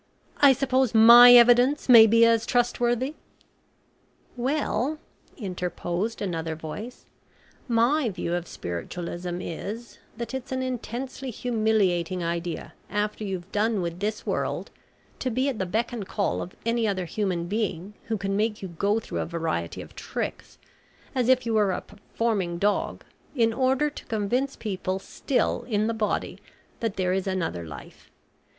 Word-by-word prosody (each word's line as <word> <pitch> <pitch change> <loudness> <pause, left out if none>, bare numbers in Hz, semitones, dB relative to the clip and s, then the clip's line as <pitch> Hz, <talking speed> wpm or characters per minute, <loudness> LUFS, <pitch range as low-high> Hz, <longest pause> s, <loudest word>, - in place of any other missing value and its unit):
"I 280 -2 +7
suppose 260 -2 +1
my 235 +2 +10
evidence 245 +4 +6
may 230 -3 +9
be 230 +1 +6
as 230 0 +3
trustworthy." 245 +2 +1 1.2
"Well," 265 +1 -1 0.4
interposed 180 +1 -3
another 165 -4 -3
voice, 185 +10 -8 0.6
"my 240 +3 +2
view 175 -3 -3
of 175 -1 -2
spiritualism 175 - -5
is, 215 +8 -6 0.2
that 235 +2 -5
it's 265 0 -5
an 260 0 -1
intensely 255 +1 -5
humiliating 210 -7 0
idea 170 0 -4 0.2
after 210 +1 -2
you've 190 -2 -5
done 215 0 +1
with 170 0 -4
this 210 +2 -3
world - - -2 0.5
to 260 - -1
be 255 +3 0
at 255 - -4
the 190 - -1
beck 225 +6 -1
and 210 -5 -5
call 200 - -1
of 180 - -8
any 230 -1 +1
other 190 -3 -1
human 180 -1 -2
being 200 -1 -3
who 225 -1 -2
can 195 0 -2
make 210 0 -1
you 190 - -5
go 200 +6 0
through - - -5
a - - -1
variety 160 - -3
of - - -16
tricks, - - -5 0.6
as 255 -2 +1
if 255 -2 +4
you 230 - -1
were 210 -3 +3
a 180 - -2
performing 205 -5 -3
dog, 205 +3 0 0.3
in 230 -3 +2
order 265 +4 +2
to - - -10
convince 240 +6 -1
people 190 -3 -3
still 245 +7 -1
in 210 -1 +1
the 230 - 0
body 220 -2 -2 0.4
that 225 -3 -2
there 185 -1 0
is 190 0 -1
another 170 - -2
life. 75 -3 -12
215 Hz, 150 wpm, -26 LUFS, 185-240 Hz, 1.2 s, my